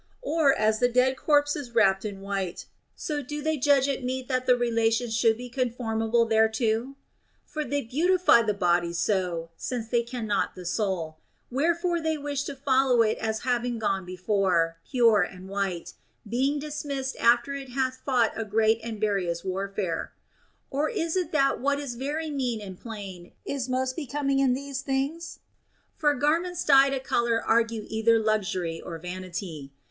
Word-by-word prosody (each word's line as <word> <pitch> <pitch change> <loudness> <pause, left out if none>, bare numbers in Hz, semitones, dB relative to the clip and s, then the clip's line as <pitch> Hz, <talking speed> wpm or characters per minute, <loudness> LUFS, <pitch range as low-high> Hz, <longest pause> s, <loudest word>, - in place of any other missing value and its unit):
Or, 320 - +3
as 215 0 +2
the 245 - +3
dead 255 +2 +3
corpse 290 0 +2
is 265 -5 -7
wrapped 195 -3 +4
in 200 -2 -5
white, 195 -3 -3 0.3
so 295 -2 -3
do 295 +3 -5
they 315 0 +1
judge 275 0 +3
it 275 -2 -2
meet 255 0 -3
that 255 -1 -1
the 250 - +6
relations 230 -1 +1
should 225 -1 +3
be 250 +1 -7
conformable 235 -2 0
thereto? 220 +3 +1 0.5
For 305 - -4
they 285 -1 -2
beautify 335 +3 +4
the 215 -3 0
body 175 -3 +1
so, 170 -2 -1
since 240 -3 -4
they 235 -1 +2
cannot 235 -3 -2
the 180 - -9
soul; 175 -5 -2 0.3
wherefore 340 +5 +1
they 320 -1 0
wish 285 -1 -3
to 285 - -5
follow 265 -3 +3
it 215 -1 0
as 220 0 -2
having 245 -1 0
gone 195 -3 -1
before, 180 -2 0
pure 230 -5 +4
and 180 +1 -5
white, 195 -3 -3 0.3
being 265 +6 +1
dismissed 285 -2 -4
after 240 +3 +3
it 275 -1 -6
hath 260 0 -2
fought 245 -5 +2
a 225 - -2
great 220 +1 +2
and 225 -2 -5
various 190 -5 -1
warfare. 190 -2 -3 0.6
Or 290 +3 0
is 335 -7 -2
it 360 -4 -1
that 275 -2 +2
what 280 +2 +1
is 280 -4 -4
very 295 +6 -3
mean 250 -5 -1
and 195 -3 -8
plain 195 -6 -8
is 260 -2 -3
most 255 0 -1
becoming 275 -2 -1
in 260 -2 +3
these 275 0 -5
things? 275 +5 -2 0.6
For 295 -2 +2
garments 335 +6 0
dyed 275 -1 +7
of 270 -1 -2
a - - -20
color 235 -2 +1
argue 230 -1 +1
either 220 +1 +3
luxury 195 -6 -1
or 170 -2 -6
vanity. 180 -4 -6
240 Hz, 170 wpm, -27 LUFS, 205-275 Hz, 0.6 s, dyed